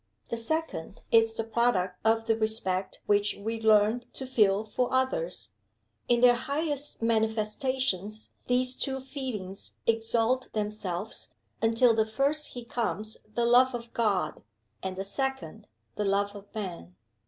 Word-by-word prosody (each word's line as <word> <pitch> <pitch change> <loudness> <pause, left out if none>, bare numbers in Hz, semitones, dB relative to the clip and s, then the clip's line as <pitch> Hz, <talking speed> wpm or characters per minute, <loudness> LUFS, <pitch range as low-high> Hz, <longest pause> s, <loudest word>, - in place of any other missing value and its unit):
The 235 - -2
second 230 - -3
is 225 0 +4
the 225 - 0
product 220 -6 +1
of 225 0 +3
the 225 -1 +3
respect 220 -4 -1
which 205 0 +2
we 225 +2 -4
learn 220 +2 +4
to 265 - -3
feel 215 -5 +3
for 245 +3 -1
others. 260 - 0 0.6
In 240 -1 +3
their 245 -1 +8
highest 285 +1 -3
manifestations, 220 -1 0
these 250 +1 +1
two 265 0 -2
feelings 255 -8 -5
exalt 230 +2 +1
themselves, 210 -2 -3 0.3
until 230 +1 +4
the 220 0 +2
first 280 +7 0
he 245 -1 -7
comes 220 -2 -2 0.2
the 235 - +2
love 250 +2 +5
of 235 -1 -7
God, 200 -9 0 0.4
and 190 0 -3
the 195 - -3
second 215 - -3 0.3
the 210 - -2
love 200 +1 +1
of 200 0 -9
Man. 175 - -6
225 Hz, 140 wpm, -29 LUFS, 205-250 Hz, 0.6 s, their